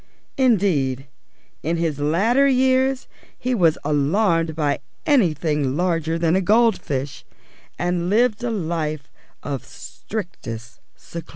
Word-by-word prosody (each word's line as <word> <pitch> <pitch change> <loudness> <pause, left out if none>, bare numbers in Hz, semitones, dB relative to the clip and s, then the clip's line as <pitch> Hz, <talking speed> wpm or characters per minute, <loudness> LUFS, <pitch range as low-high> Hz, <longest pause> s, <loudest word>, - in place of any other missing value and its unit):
Indeed, 155 - +2 0.5
in 165 +3 -1
his 160 -4 -1
latter 210 - +3
years 260 0 +2 0.3
he 255 0 -2
was 170 -8 +3
alarmed 165 +3 +1
by 150 -3 0 0.3
anything 155 - +1
larger 165 -2 0
than 165 0 +2
a 190 - +2
goldfish, 175 - +1 0.5
and 175 0 -1
lived 230 +2 +2
a 245 - 0
life 160 -7 -3 0.3
of 140 -2 -4
strictest 120 - -8 0.2
seclusion. 170 -1 -9
170 Hz, 110 wpm, -22 LUFS, 150-220 Hz, 0.5 s, latter